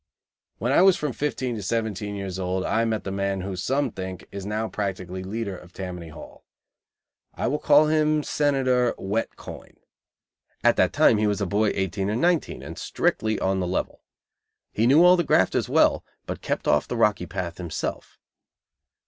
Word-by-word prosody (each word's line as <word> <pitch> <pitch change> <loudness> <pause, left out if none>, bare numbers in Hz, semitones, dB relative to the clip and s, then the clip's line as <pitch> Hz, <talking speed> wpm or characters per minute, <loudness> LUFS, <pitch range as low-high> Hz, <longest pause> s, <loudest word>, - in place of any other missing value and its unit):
When 120 - -1
I 140 - +5
was 190 -1 +6
from 150 -4 -3
fifteen 130 -3 -2
to - - -5
seventeen 105 0 -2
years 95 -2 -5
old, 95 0 -2
I 115 +1 +1
met 110 -2 -1
the 95 - -4
man 100 -1 -1
who, 95 0 -4
some 135 +10 -1
think, 95 -1 -7
is 100 0 -6
now 110 +1 -2
practically 95 -3 -4
leader 100 +1 -4
of 90 0 -14
Tammany 90 -3 -6
Hall. 80 - -12 0.9
I - - -3
will 150 +4 0
call 150 0 +5
him 155 -1 +2
Senator 130 -5 +1
Wet 105 +4 -2
Coin. - - -11 0.9
At - - +5
that - - +3
time 110 - +4
he 105 - +2
was 105 0 0
a 100 - 0
boy 105 +3 +1
eighteen 95 +1 -1
or 105 - -1
nineteen 170 +6 0
and - - -8
strictly 110 -1 0
on 95 0 0
the 90 - -1
level. 90 - -3 0.7
He 115 +2 +1
knew 145 +6 +6
all 180 +1 +7
the 175 - +2
grafters 95 - +2
well, - - +3 0.2
but - - -6
kept - - -3
off - - +2
the - - -3
Rocky - - +2
Path 85 -2 -5
himself. 85 -3 -5
105 Hz, 180 wpm, -25 LUFS, 95-130 Hz, 0.9 s, all